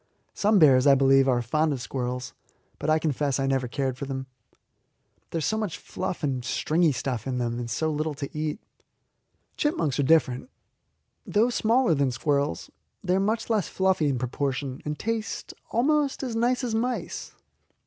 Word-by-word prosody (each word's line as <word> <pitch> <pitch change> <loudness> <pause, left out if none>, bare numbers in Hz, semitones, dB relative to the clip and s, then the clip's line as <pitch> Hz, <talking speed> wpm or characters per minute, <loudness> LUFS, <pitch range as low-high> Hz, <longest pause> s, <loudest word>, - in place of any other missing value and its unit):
Some 210 +1 +3
bears, 140 -5 +6
I 140 - +8
believe, 135 0 +5
are 120 -1 +2
fond 155 +6 +1
of 135 - -4
squirrels, 125 0 -4 0.5
but 150 - -2
I 155 - +5
confess 145 -3 0
I 135 - +1
never 135 -2 0
cared 130 0 -2
for 140 - -3
them. 135 -1 -4 1.0
There - - -3
is 160 - -1
so 220 - 0
much 210 -7 -3
fluff 175 - -5
and 130 -4 -1
stringy 155 +6 +2
stuff 125 -2 -3
in 130 -1 -1
them, 120 -1 -2
and 120 -1 -4
so 155 +7 0
little 155 0 -2
to 140 +1 -6
eat. 155 +5 -2 1.0
Chipmunks 295 - 0
are - - +5
different. 140 - +2 0.8
Though 225 +4 +2
smaller 235 -3 +3
than 140 -3 +2
squirrels, 140 - -1 0.3
they 180 - +1
are 190 - +3
much 220 +3 0
less 215 -7 +1
fluffy 190 -5 +1
in 135 - 0
proportion, 130 +1 -3
and 150 0 -3
taste 225 +3 -3 0.2
almost 285 +3 +1
as 245 -4 -3
nice 245 +3 +1
as 240 -3 -2
mice. 240 +3 -3
150 Hz, 175 wpm, -26 LUFS, 130-205 Hz, 1.0 s, I